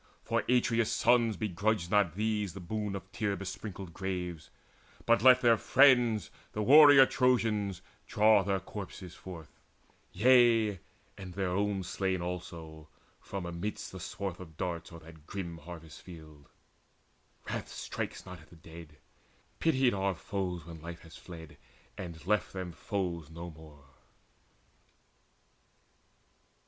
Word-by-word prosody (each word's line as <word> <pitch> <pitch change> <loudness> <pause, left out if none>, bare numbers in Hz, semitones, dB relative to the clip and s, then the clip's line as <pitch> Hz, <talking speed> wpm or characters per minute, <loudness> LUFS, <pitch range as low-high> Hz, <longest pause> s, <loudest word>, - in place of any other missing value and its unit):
For - - 0
Atreus' 115 -2 +2
sons 120 -2 +3
begrudged 105 -2 -1
not 100 -6 +3
these 105 -3 -1
the - - -6
boon 105 +3 -3
Of 95 0 -8
tear 100 -2 -1
besprinkled 95 -2 -7
graves, 90 -4 -4 0.6
but 115 -3 +4
let 125 +1 +7
their 115 -2 +5
friends, 125 -6 +4 0.2
The 105 - -2
warrior 145 +1 +9
Trojans, 110 -8 +1 0.2
draw 105 -1 +5
their 95 0 0
corpses 95 -2 -8
forth, 85 -5 -11 0.5
Yea, 115 -2 +4 0.4
and 90 -2 -9
their 95 -2 -1
own 100 0 0
slain 95 0 -1
also, 85 -3 -7 0.3
from 100 -3 -6
amidst 85 +5 -5
The 95 - -8
swath 95 0 -5
of 80 -4 -12
darts 90 -2 -4
o'er 85 -1 -11
that 80 -1 -15
grim 85 -4 -6
harvest 80 0 -11
field. 80 -5 -13 1.0
Wrath - - -4
strikes - - -5
not 90 -3 -10
at 80 - -19
the 85 - -16
dead: 80 -2 -13 0.6
pitied 135 -6 +3
are 95 -1 0
foes 90 -3 -4
When 80 -2 -10
life 85 +1 -8
has 80 -2 -14
fled, 80 -5 -11 0.4
and 85 -3 -8
left 105 -1 0
them 95 -2 -5
foes 85 -4 -4
no 85 +1 -8
more. 75 -3 -15
95 Hz, 135 wpm, -31 LUFS, 85-105 Hz, 1.0 s, warrior